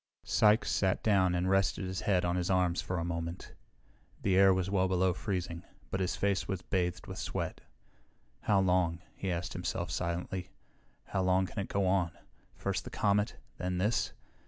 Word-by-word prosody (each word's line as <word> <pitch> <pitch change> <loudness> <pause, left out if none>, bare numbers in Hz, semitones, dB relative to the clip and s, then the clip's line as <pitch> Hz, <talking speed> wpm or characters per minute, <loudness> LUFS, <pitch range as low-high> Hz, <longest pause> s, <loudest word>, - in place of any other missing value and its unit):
Sykes 105 +1 +4
sat 95 -1 +1
down 95 -4 +3
and 90 +1 0
rested 95 0 +2
his 95 -1 -3
head 90 -3 +2
on 85 0 +1
his 90 0 -1
arms 90 -2 +2
for 90 - -3
a 85 - -1
moment. 85 0 -4 0.7
The 95 -2 +3
air 95 0 +7
was 95 -1 +1
well 95 -1 +2
below 95 0 +2
freezing, 90 -3 -3 0.3
but 95 - -1
his 95 -1 0
face 95 -3 0
was 95 -3 -3
bathed 90 -2 -1
with - - -7
sweat. - - -3 0.8
How 100 -2 +2
long? 90 -2 +2
he 95 - -2
asked 85 0 -3
himself - - -3
silently. 90 +2 -3 0.6
How 95 - -1
long 95 0 +3
can 100 - -6
it 100 - -2
go 100 -1 0
on? 90 -3 +2 0.4
First - - -2
the - - -7
comet, 105 +1 +1 0.2
then 90 0 -1
this. 105 +6 +1
95 Hz, 180 wpm, -32 LUFS, 90-95 Hz, 0.8 s, air